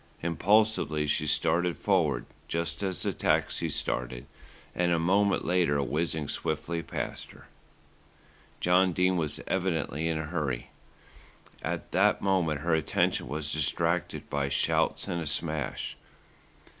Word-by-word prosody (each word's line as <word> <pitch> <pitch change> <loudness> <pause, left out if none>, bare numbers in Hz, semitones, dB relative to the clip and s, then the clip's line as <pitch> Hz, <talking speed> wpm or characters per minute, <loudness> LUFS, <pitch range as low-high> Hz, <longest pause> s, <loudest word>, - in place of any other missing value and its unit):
Impulsively 90 -3 +2
she 75 - 0
started 90 0 +2
forward, 80 -11 +1 0.2
just 85 +2 -2
as 95 -2 -2
the - - 0
taxi - - +1
started - - -2 0.5
and 90 0 +1
a 85 - +3
moment 95 +4 +2
later 85 -5 +2
whizzed 80 0 -1
swiftly 85 0 -2
past - - -5
her. - - -16 1.1
John 90 +1 +4
Dene 90 +2 +2
was 80 -4 -2
evidently 80 -4 -1
in 80 -1 0
a 80 - -2
hurry. 75 -7 -3 0.9
At - - -4
that - - +3
moment 85 -7 +1
her 80 +1 +1
attention 80 -5 +1
was 75 +2 -3
distracted 85 +3 0
by 70 -1 -1
shouts 70 - +1
and 85 -1 -2
a 80 - -4
smash. 75 -2 -2
85 Hz, 130 wpm, -29 LUFS, 75-90 Hz, 1.1 s, John